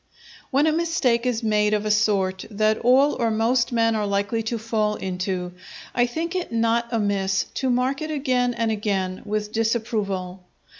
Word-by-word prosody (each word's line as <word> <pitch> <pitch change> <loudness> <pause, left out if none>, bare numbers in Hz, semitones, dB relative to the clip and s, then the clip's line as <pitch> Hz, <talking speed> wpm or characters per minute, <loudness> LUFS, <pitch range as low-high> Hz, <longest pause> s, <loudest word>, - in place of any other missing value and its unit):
_" - - -31
When 280 +2 +3
a 315 - +3
mistake 290 -8 +1
is 240 -2 -1
made 210 -1 +2
of 210 0 -2
a 215 - +1
sort 195 -3 +1
that 215 0 +1
all 265 +5 +4
or 230 - +2
most 235 +3 +1
men 230 -1 +2
are 210 -1 -1
likely 200 +3 0
to 225 +1 -2
fall 215 -1 -1
into, 185 -1 -3 0.4
I 245 0 +2
think 330 +7 -3
it 365 -7 -3
not 230 +1 +1
amiss 200 -4 0
to 265 - -1
mark 255 +3 0
it 310 - -3
again 255 -5 0
and 230 -1 0
again 195 -3 -2
with 210 0 -2
disapproval. 215 -5 -2
225 Hz, 180 wpm, -23 LUFS, 205-245 Hz, 0.4 s, all